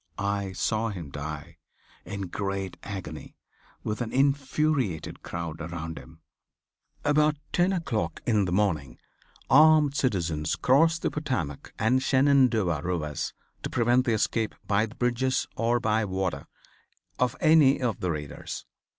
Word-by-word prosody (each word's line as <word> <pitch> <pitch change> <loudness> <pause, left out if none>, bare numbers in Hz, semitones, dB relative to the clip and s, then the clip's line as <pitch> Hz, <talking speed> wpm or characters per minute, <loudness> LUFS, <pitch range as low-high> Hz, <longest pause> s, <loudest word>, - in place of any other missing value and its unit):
I 100 -1 -2
saw 110 +3 0
him 85 -9 -7
die, 75 +3 -7 0.5
in 100 -1 -5
great 95 0 -3
agony, 95 -6 -7 0.5
with 105 +3 -3
an 115 - -3
infuriated 135 - 0
crowd 85 -1 -5
around 80 0 -5
him. 80 0 -15 0.8
About 150 +1 +3 0.2
ten 180 +2 +3
o'clock 110 - -2
in 105 -4 +2
the 85 - -3
morning, 85 -10 0 0.5
armed 155 0 +6
citizens 85 - 0
crossed 165 +6 +3
the - - +1
Potomac 95 - -3
and 120 +4 +2
Shenandoah 130 - +3
rivers 80 -4 -3 0.3
to - - -4
prevent 120 +2 +2
the 115 - +2
escape 110 +1 0
by 105 +2 +2
the 115 - -14
bridges, 125 +1 0
or 115 +2 +1
by 110 -1 +1
water, 95 -1 -2 0.7
of 125 -2 +1
any 155 -4 +5
of 120 -6 -1
the 90 - -1
raiders. 75 -3 -5
110 Hz, 135 wpm, -27 LUFS, 85-130 Hz, 0.8 s, armed